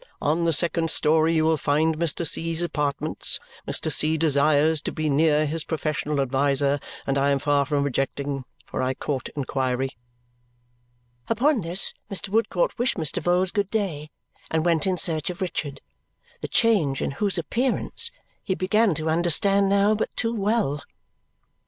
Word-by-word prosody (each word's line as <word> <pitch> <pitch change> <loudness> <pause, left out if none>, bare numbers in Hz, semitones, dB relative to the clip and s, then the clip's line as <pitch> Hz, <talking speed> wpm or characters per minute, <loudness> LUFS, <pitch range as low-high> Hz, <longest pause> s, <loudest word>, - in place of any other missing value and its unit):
On 160 +4 0
the 165 - +3
second 165 +1 +1
story 160 +2 +3
you 155 -1 +2
will 160 0 +3
find 155 +3 +1
Mr. 170 0 +1
C.'s 165 +2 0
apartments. 150 -2 -1 0.3
Mr. - - -1
C. 155 +1 +2
desires 155 0 +3
to - - -3
be 155 -1 -2
near 150 +1 +3
his 155 +1 -2
professional 150 -2 -2
adviser, 140 +1 +1 0.3
and 135 0 0
I 140 +1 +2
am 140 - +3
far 145 0 +1
from 145 -2 0
objecting, 135 0 -2 0.2
for - - -4
I 130 0 -1
court 135 -2 -3
inquiry." 130 -2 -1 1.4
Upon 250 +3 +2
this 175 +3 +3 0.2
Mr. 195 0 -3
Woodcourt 230 - 0
wished 245 -1 0
Mr. 160 -4 -2
Vholes 180 +1 +1
good 200 -2 0
day 175 -9 -2 0.4
and 160 0 0
went 170 0 +2
in 185 -1 +1
search 160 -4 0
of 180 - -6
Richard, 160 -6 -4 0.6
the - - -3
change 185 - +2
in - - -1
whose 195 +6 -1
appearance 250 - -1 0.3
he 190 - -1
began 200 0 +2
to 155 +2 -4
understand 175 +5 +2
now 200 +1 +3
but 215 - -1
too 230 0 -1
well. 205 -9 0
160 Hz, 160 wpm, -24 LUFS, 145-190 Hz, 1.4 s, the